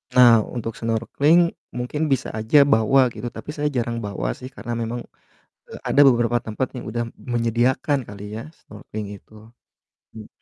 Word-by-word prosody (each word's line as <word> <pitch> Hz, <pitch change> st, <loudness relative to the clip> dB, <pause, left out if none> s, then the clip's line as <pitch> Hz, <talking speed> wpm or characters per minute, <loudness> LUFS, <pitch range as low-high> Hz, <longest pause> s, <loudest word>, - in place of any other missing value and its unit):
Nah 120 Hz, -3 st, +8 dB, 0.2 s
untuk 115 Hz, -1 st, -3 dB
snorkeling 140 Hz, +9 st, +2 dB, 0.3 s
mungkin 125 Hz, +5 st, -3 dB
bisa 130 Hz, -1 st, 0 dB
aja 110 Hz, +7 st, +3 dB, 0.2 s
bawa 110 Hz, +5 st, +4 dB
gitu, 120 Hz, -, -6 dB
tapi 115 Hz, +4 st, -9 dB
saya 150 Hz, -1 st, -2 dB
jarang 115 Hz, 0 st, -1 dB
bawa 95 Hz, -12 st, -3 dB
sih 130 Hz, -, -7 dB
karena 120 Hz, -, -7 dB
memang, 120 Hz, +1 st, -3 dB, 0.7 s
eee, -, -, -8 dB
ada 145 Hz, -, +4 dB
beberapa 120 Hz, -2 st, +3 dB
tempat 110 Hz, +4 st, -2 dB
yang 125 Hz, -, -6 dB
udah 120 Hz, +1 st, -2 dB
menyediakan 120 Hz, +5 st, 0 dB
kali 100 Hz, 0 st, -9 dB
ya 115 Hz, -, -5 dB, 0.2 s
snorkeling 105 Hz, 0 st, -8 dB
itu, 100 Hz, -, -18 dB, 0.8 s
mmm. 110 Hz, -1 st, -11 dB
120 Hz, 155 wpm, -22 LUFS, 110-130 Hz, 0.8 s, Nah